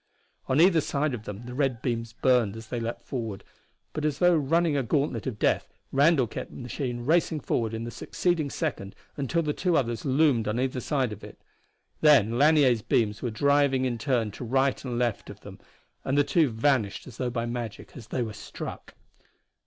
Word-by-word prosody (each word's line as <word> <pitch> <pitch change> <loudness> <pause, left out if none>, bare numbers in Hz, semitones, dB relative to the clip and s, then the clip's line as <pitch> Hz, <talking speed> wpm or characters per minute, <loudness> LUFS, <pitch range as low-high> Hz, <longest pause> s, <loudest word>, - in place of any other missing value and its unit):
On 130 +3 +2
either 170 -1 +6
side 145 0 -1
of 110 -3 -6
them 105 +3 -7
the 125 - -7
red 130 -3 0
beams 115 -2 -2
burned 120 -3 +2
as 115 -1 -10
they 120 - -2
leapt 115 +1 -4
forward, 115 -6 -5 0.5
but 155 - -3
as 150 -2 0
though 175 0 +4
running 160 +1 +2
a 140 - +2
gauntlet 130 -1 -1
of 120 -5 -3
death - - +1 0.2
Randall 140 -1 +4
kept 115 - -6
the - - -12
machine 125 -1 -4
racing 160 +1 +2
forward 115 -5 -1
in 115 0 -4
the 120 - -5
succeeding 170 0 -1
second 130 - -4 0.2
until 150 +4 -1
the 150 -1 -1
two 180 0 +1
others 120 -4 -1
loomed 135 -4 +2
on 110 +3 -1
either 130 0 -1
side 130 -4 -1
of 105 - -12
it. - - -11 0.6
Then 125 -7 +5
Lanier's 145 -6 +5
beams 105 -2 0
were 120 - -1
driving 140 +2 +2
in 120 -2 -2
turn 120 -4 0
to 115 - -8
right 135 +3 +1
and 125 -3 -3
left 120 -3 -1
of - - -11
them - - -11 0.4
and 135 - 0
the 145 - +5
two 160 -1 +2
vanished 115 -2 0
as 125 - -12
though 125 -1 -1
by 120 -1 -2
magic 120 -3 -6
as 115 -4 -10
they 125 +1 -1
were 110 -2 -5
struck. - - -8
130 Hz, 200 wpm, -27 LUFS, 115-145 Hz, 0.6 s, either